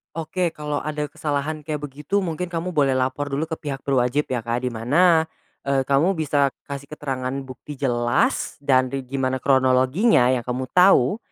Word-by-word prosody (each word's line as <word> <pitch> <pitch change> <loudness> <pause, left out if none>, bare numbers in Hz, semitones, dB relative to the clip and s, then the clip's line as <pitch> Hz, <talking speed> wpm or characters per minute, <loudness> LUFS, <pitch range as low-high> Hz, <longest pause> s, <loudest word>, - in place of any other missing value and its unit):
Oke, 165 +1 -2
kalau 150 -1 -3
ada 150 -1 -3
kesalahan 150 +1 -3
kayak 150 -2 -3
begitu 150 +9 -2
mungkin 180 0 -3
kamu 170 +1 -4
boleh 140 -6 +2
lapor 130 +2 -1
dulu 155 +4 -2
ke 160 - -3
pihak 140 -3 -5
berwajib 135 +1 0
ya, 120 -3 -2
Kak. 120 +1 -1
Di 125 - -1
mana, 160 +9 +3 0.4
eee, 135 -1 +2
kamu 140 +8 +2
bisa 145 -4 +1 0.2
kasih 140 0 -5
keterangan 135 -3 -4
bukti 135 +3 -9
jelas 120 -3 0
dan 130 -1 +2
ri 135 - -2
gimana 130 0 -2
kronologinya 130 - +3
yang 125 -3 0
kamu 130 0 -3
tahu, 180 - +5
140 Hz, 170 wpm, -23 LUFS, 130-155 Hz, 0.4 s, tahu